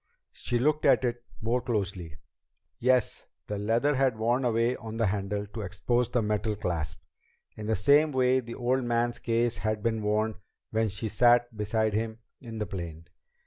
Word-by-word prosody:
She 120 Hz, -, -2 dB
looked 150 Hz, +5 st, +1 dB
at 140 Hz, -3 st, +4 dB
it 120 Hz, 0 st, -2 dB, 0.2 s
more 120 Hz, +3 st, +1 dB
closely. 95 Hz, -, -3 dB, 0.6 s
Yes, 125 Hz, -1 st, +2 dB, 0.2 s
the 105 Hz, -1 st, -4 dB
leather 115 Hz, +8 st, +2 dB
had 130 Hz, -4 st, +2 dB
worn 120 Hz, +4 st, +1 dB
away 120 Hz, +1 st, +2 dB
on 110 Hz, 0 st, -7 dB
the 115 Hz, -, +2 dB
handle 100 Hz, +1 st, -1 dB
to 105 Hz, +2 st, -7 dB
expose 110 Hz, +5 st, 0 dB
the 120 Hz, -2 st, +1 dB
metal 105 Hz, 0 st, 0 dB
clasp, 85 Hz, -6 st, -3 dB, 0.5 s
in 105 Hz, -, -6 dB
the 110 Hz, -, +2 dB
same 145 Hz, +8 st, +4 dB
way 130 Hz, -1 st, +3 dB
the 115 Hz, -2 st, -7 dB
old 125 Hz, +2 st, 0 dB
man's 120 Hz, 0 st, 0 dB
case 115 Hz, 0 st, 0 dB
had 110 Hz, 0 st, -2 dB
been 110 Hz, -1 st, 0 dB
worn 110 Hz, +1 st, 0 dB, 0.3 s
when 110 Hz, 0 st, +1 dB
she 105 Hz, +3 st, -4 dB
sat 120 Hz, +2 st, +3 dB
beside 110 Hz, 0 st, 0 dB
him 110 Hz, +1 st, -2 dB, 0.2 s
in 115 Hz, -3 st, -8 dB
the 105 Hz, -, -2 dB
plane. 85 Hz, -4 st, -6 dB
115 Hz, 175 wpm, -28 LUFS, 105-120 Hz, 0.6 s, at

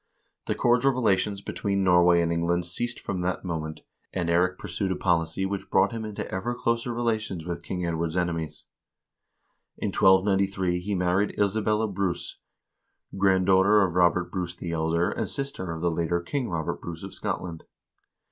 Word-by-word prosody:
The -, -, 0 dB
cordial 125 Hz, +3 st, +3 dB
relations 100 Hz, -4 st, +1 dB
between 100 Hz, -1 st, -1 dB
Nor 90 Hz, -2 st, +5 dB
way 85 Hz, -1 st, +5 dB
and 85 Hz, 0 st, 0 dB
England 85 Hz, +1 st, 0 dB
ceased 120 Hz, +8 st, -3 dB
from 90 Hz, -2 st, -3 dB
that 90 Hz, +1 st, -2 dB
moment, 80 Hz, -3 st, -4 dB, 0.3 s
and 85 Hz, -3 st, -2 dB
Eirik 90 Hz, +2 st, +2 dB
pursued 95 Hz, +2 st, -3 dB
a -, -, 0 dB
policy 85 Hz, 0 st, 0 dB
which 100 Hz, 0 st, -4 dB
brought -, -, +3 dB
him 115 Hz, -1 st, -4 dB
into 105 Hz, -1 st, -5 dB
ever 115 Hz, +6 st, -2 dB
closer 115 Hz, +1 st, -1 dB
relations 110 Hz, -7 st, -2 dB
with 85 Hz, -1 st, -4 dB
King 90 Hz, +1 st, -3 dB
Ed 85 Hz, -, -1 dB
ward's 80 Hz, +1 st, -2 dB
enemies. 85 Hz, -3 st, -2 dB, 1.1 s
In -, -, -2 dB
1293 95 Hz, -1 st, +3 dB
he 100 Hz, +3 st, -2 dB
married 90 Hz, +3 st, +1 dB
Isabella 105 Hz, +2 st, +1 dB
Bruce, 95 Hz, -3 st, -3 dB, 0.8 s
granddaughter 95 Hz, +1 st, +4 dB
of 90 Hz, -3 st, 0 dB
Robert 90 Hz, 0 st, +2 dB
Bruce 90 Hz, -2 st, -3 dB
the 85 Hz, -1 st, -5 dB
Elder, 85 Hz, +1 st, +1 dB
and -, -, -2 dB
sister 140 Hz, -, -3 dB
of 80 Hz, -1 st, -5 dB
the 85 Hz, 0 st, +1 dB
later 85 Hz, +1 st, 0 dB
King 125 Hz, +9 st, -3 dB
Robert 85 Hz, 0 st, -3 dB
Bruce 85 Hz, 0 st, -7 dB
of 95 Hz, -, -7 dB
Scotland. 85 Hz, -3 st, -4 dB
90 Hz, 165 wpm, -26 LUFS, 85-100 Hz, 1.1 s, Nor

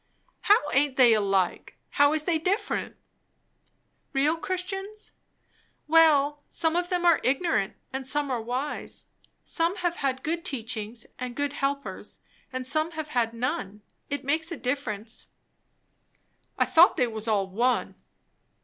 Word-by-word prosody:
"How 415 Hz, -, +6 dB
aint 275 Hz, -1 st, +2 dB
they 245 Hz, -3 st, +7 dB
alike? 195 Hz, -4 st, 0 dB
how 285 Hz, +1 st, +4 dB
is 310 Hz, -1 st, 0 dB
they 325 Hz, 0 st, +1 dB
different?" 385 Hz, +6 st, -1 dB, 1.2 s
"Real 285 Hz, +4 st, +2 dB
Christians? 385 Hz, +4 st, -5 dB, 0.8 s
Well 295 Hz, -2 st, +5 dB
some 320 Hz, 0 st, +1 dB
of 355 Hz, 0 st, 0 dB
them 355 Hz, -1 st, 0 dB
are 340 Hz, -2 st, +5 dB
ignorant, 275 Hz, -, +1 dB, 0.2 s
and 265 Hz, -1 st, -4 dB
some 290 Hz, 0 st, +1 dB
are 240 Hz, -3 st, -1 dB
wise. 250 Hz, +6 st, -4 dB, 0.4 s
Some 335 Hz, +3 st, 0 dB
have 350 Hz, -1 st, -1 dB
had 265 Hz, -2 st, -2 dB
good 335 Hz, +2 st, -2 dB
teachings 230 Hz, -, -4 dB
and 250 Hz, -1 st, -5 dB
good 285 Hz, +1 st, -1 dB
helpers, 280 Hz, 0 st, -4 dB, 0.3 s
and 255 Hz, 0 st, -4 dB
some 310 Hz, +5 st, +1 dB
have 310 Hz, -1 st, -5 dB
had 240 Hz, -5 st, +1 dB
none; 230 Hz, -, -3 dB, 0.3 s
it 285 Hz, -1 st, -4 dB
makes 320 Hz, +4 st, 0 dB
a 335 Hz, -, -4 dB
difference." 240 Hz, -4 st, -3 dB, 1.3 s
"I -, -, +3 dB
thought 340 Hz, +2 st, +6 dB
they 250 Hz, -, +3 dB
was 220 Hz, -1 st, -4 dB
all 205 Hz, -3 st, +2 dB
one." 235 Hz, +7 st, 0 dB
285 Hz, 140 wpm, -27 LUFS, 245-325 Hz, 1.3 s, they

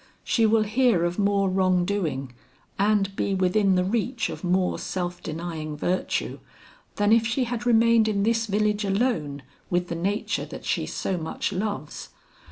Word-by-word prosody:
She 225 Hz, -2 st, +2 dB
will 220 Hz, 0 st, +3 dB
hear 215 Hz, -4 st, +2 dB
of 175 Hz, +3 st, -2 dB
more 200 Hz, -1 st, +2 dB
wrong 185 Hz, -1 st, +2 dB
doing, 155 Hz, -10 st, -2 dB, 0.5 s
and 200 Hz, -1 st, +2 dB
be 195 Hz, -, 0 dB
within 190 Hz, +1 st, +2 dB
the 180 Hz, -, +2 dB
reach 230 Hz, +4 st, -1 dB
of -, -, -8 dB
more 180 Hz, +1 st, +1 dB
self 175 Hz, -1 st, -4 dB
denying 160 Hz, -2 st, -5 dB
virtue, 180 Hz, +5 st, -1 dB, 0.6 s
than 205 Hz, +1 st, +3 dB
if 225 Hz, 0 st, +4 dB
she 240 Hz, +3 st, 0 dB
had 240 Hz, 0 st, -3 dB
remained 230 Hz, -1 st, +5 dB
in 200 Hz, -2 st, 0 dB
this 225 Hz, +1 st, +1 dB
village 210 Hz, +1 st, +1 dB
alone 195 Hz, -, -1 dB, 0.3 s
with 175 Hz, 0 st, 0 dB
the 170 Hz, -, -2 dB
nature 195 Hz, +5 st, -1 dB
that -, -, -9 dB
she -, -, -1 dB
so 185 Hz, -2 st, -2 dB
much 160 Hz, +5 st, -3 dB
loves. 195 Hz, -5 st, -4 dB
200 Hz, 165 wpm, -25 LUFS, 180-220 Hz, 0.6 s, remained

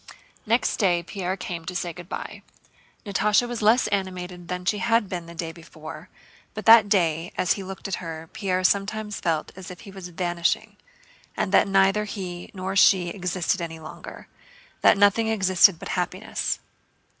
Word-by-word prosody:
Next 230 Hz, +3 st, +2 dB
day 175 Hz, -4 st, +2 dB
Pierre 185 Hz, +1 st, -4 dB
came 175 Hz, -2 st, -5 dB
to 180 Hz, -, -5 dB
say 175 Hz, -1 st, -2 dB
good 175 Hz, +1 st, -11 dB
by. -, -, -6 dB, 0.6 s
Natásha 210 Hz, +3 st, +2 dB
was 240 Hz, -2 st, -4 dB
less 220 Hz, +4 st, +4 dB
animated 180 Hz, -3 st, -3 dB
than 180 Hz, 0 st, -4 dB
she 205 Hz, +3 st, +1 dB
had 230 Hz, -2 st, +2 dB
been 175 Hz, -3 st, -5 dB
the 170 Hz, -, -11 dB
day 165 Hz, -1 st, -4 dB
before; 160 Hz, 0 st, -11 dB, 0.5 s
but 215 Hz, -, -6 dB
that 225 Hz, -2 st, +8 dB
day 170 Hz, -4 st, +1 dB
as 180 Hz, -, +2 dB
he 200 Hz, -, -6 dB
looked 190 Hz, +1 st, -7 dB
at 195 Hz, -, -5 dB
her 165 Hz, -2 st, -7 dB
Pierre 185 Hz, -3 st, -1 dB
sometimes 210 Hz, +2 st, 0 dB
felt 160 Hz, -2 st, -1 dB
as 190 Hz, -1 st, -9 dB
if 180 Hz, -, -10 dB
he 200 Hz, -, -11 dB
was 190 Hz, -2 st, -9 dB
vanishing 175 Hz, -1 st, -1 dB, 0.6 s
and 190 Hz, -, -1 dB
that 200 Hz, -, +5 dB
neither 195 Hz, +2 st, +3 dB
he 180 Hz, -4 st, -6 dB
nor 190 Hz, 0 st, -4 dB
she 185 Hz, -3 st, +5 dB
existed 180 Hz, -1 st, -1 dB
any 165 Hz, -1 st, -5 dB
longer, 155 Hz, -1 st, -10 dB, 0.5 s
that -, -, +6 dB
nothing 205 Hz, +3 st, +4 dB
existed 190 Hz, -4 st, +4 dB
but -, -, -8 dB
happiness. 185 Hz, +3 st, -2 dB
185 Hz, 170 wpm, -25 LUFS, 175-205 Hz, 0.6 s, that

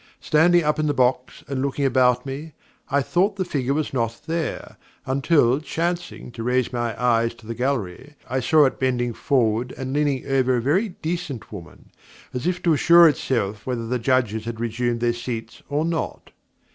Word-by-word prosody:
Standing 175 Hz, +3 st, +4 dB
up 150 Hz, 0 st, +1 dB
in 155 Hz, -, +1 dB
the 145 Hz, -, 0 dB
box 125 Hz, 0 st, 0 dB
and 135 Hz, -2 st, -2 dB
looking 140 Hz, +1 st, -1 dB
about 125 Hz, -1 st, +3 dB
me, 145 Hz, +3 st, -6 dB, 0.4 s
I 140 Hz, 0 st, +2 dB
thought 195 Hz, +7 st, +1 dB
the 190 Hz, -2 st, -2 dB
figure 140 Hz, -5 st, -1 dB
was 155 Hz, -2 st, -2 dB
not 115 Hz, -2 st, -2 dB
there, 165 Hz, -1 st, -4 dB, 0.3 s
until, 135 Hz, -1 st, +2 dB
chancing 170 Hz, -2 st, -3 dB
to 115 Hz, -, -8 dB
raise 125 Hz, +1 st, 0 dB
my 120 Hz, -2 st, -2 dB
eyes 115 Hz, -2 st, +2 dB
to 110 Hz, -, -18 dB
the 115 Hz, -, -4 dB
gallery, 125 Hz, +1 st, -3 dB
I 130 Hz, +2 st, -1 dB
saw 150 Hz, +4 st, +4 dB
it 130 Hz, -, -1 dB
bending 120 Hz, -2 st, 0 dB
forward 120 Hz, -1 st, 0 dB
and 130 Hz, 0 st, -4 dB
leaning 145 Hz, -3 st, 0 dB
over 130 Hz, -2 st, +2 dB
a -, -, +1 dB
very 180 Hz, -, +1 dB
decent 160 Hz, -6 st, -4 dB
woman, 90 Hz, -6 st, -11 dB, 0.4 s
as 125 Hz, +6 st, -3 dB
if 180 Hz, 0 st, -1 dB
to 170 Hz, -, +4 dB
assure 170 Hz, +3 st, +7 dB
itself 110 Hz, -8 st, -1 dB
whether 120 Hz, -3 st, -2 dB
the 125 Hz, +2 st, -1 dB
Judges 115 Hz, -3 st, 0 dB
had 115 Hz, -1 st, -5 dB
resumed 120 Hz, +1 st, -1 dB
their 120 Hz, 0 st, +2 dB
seats 115 Hz, -2 st, -6 dB
or 145 Hz, +2 st, 0 dB
not. 165 Hz, -1 st, -3 dB
130 Hz, 185 wpm, -23 LUFS, 120-150 Hz, 0.4 s, assure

